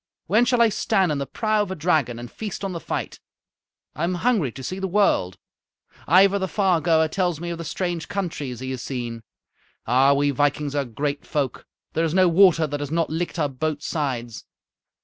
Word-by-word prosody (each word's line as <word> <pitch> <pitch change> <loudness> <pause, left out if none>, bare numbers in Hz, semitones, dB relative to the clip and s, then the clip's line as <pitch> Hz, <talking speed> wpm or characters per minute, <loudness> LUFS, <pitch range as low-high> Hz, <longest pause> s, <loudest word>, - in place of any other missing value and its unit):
"When 215 +7 +3
shall 240 -1 +4
I 230 - +4
stand 195 -4 +1
in 145 - -1
the 140 - -3
prow 215 -2 0
of 205 - -2
a 190 - -3
dragon 155 -7 +1
and 120 0 -8
feast 210 -3 -6
on 195 - -2
the 170 - -4
fight? - - -4 0.7
I 155 - -4
am 180 +2 0
hungry 190 - +1
to 135 - -9
see 185 +8 -4
the 190 - -2
world. 180 - +2 0.7
Ivar 195 +4 +5
the 190 - -1
Far 185 -3 +1
goer 160 -1 +3
tells 175 -1 -1
me 170 +1 -4
of 170 - -5
the - - -4
strange 170 0 -3
countries 150 - -4
he 130 0 -4
has 130 -2 -4
seen. 120 -3 -5 0.6
Ah! 130 +4 +4
we 145 0 +2
vikings 145 +1 0
are 145 -1 0
great 140 +4 -3
folk. 140 -4 -3 0.3
There 165 - +1
is 165 +1 0
no 185 -1 +5
water 170 -2 +5
that 145 -1 -4
has 145 -1 -4
not 165 0 0
licked 170 +3 -3
our 150 -3 +1
boats' 145 +2 -3
sides. 125 -7 -3
160 Hz, 210 wpm, -23 LUFS, 140-185 Hz, 0.7 s, Ivar